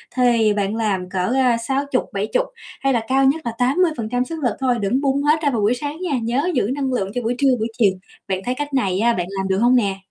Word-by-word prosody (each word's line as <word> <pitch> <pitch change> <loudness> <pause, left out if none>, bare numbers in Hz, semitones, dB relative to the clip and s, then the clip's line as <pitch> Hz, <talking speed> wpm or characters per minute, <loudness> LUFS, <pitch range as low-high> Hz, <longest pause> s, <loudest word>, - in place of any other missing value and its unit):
thì 235 -4 +3
bạn 205 0 -1
làm 200 -5 -1
cỡ, 185 +4 -1
a, 250 -3 +3
60-70, 265 - -1 0.4
hay 275 0 +2
là 235 - +1
cao 270 +2 +3
nhất 285 +4 +2
là 235 - -1
80% 250 -3 +1
sức 325 +4 -6
lực 245 - +1
thôi, 255 -2 +1
đừng 230 +7 0
bung 280 0 +1
hết 305 +2 +3
ra 290 - +3
vào 235 -5 -1
buổi 210 +4 +3
sáng 290 +4 -5
nha, 305 -8 -1
nhớ 260 +9 0
giữ 240 -2 +1
năng 270 -2 -2
lượng 195 -5 -1
cho 245 - -1
buổi 240 +1 -1
trưa, 275 +1 +3
buổi 220 - 0
chiều. 215 -5 +4 0.4
Bạn 190 -1 -1
thấy 250 - -1
cách 290 +1 -5
này 195 -8 +1
á 235 +2 +3
bạn 180 -5 -2
làm 190 - -1
được 190 0 +1
hông 240 +4 +4
nè? 200 -6 +1
245 Hz, 250 wpm, -20 LUFS, 215-275 Hz, 0.4 s, chiều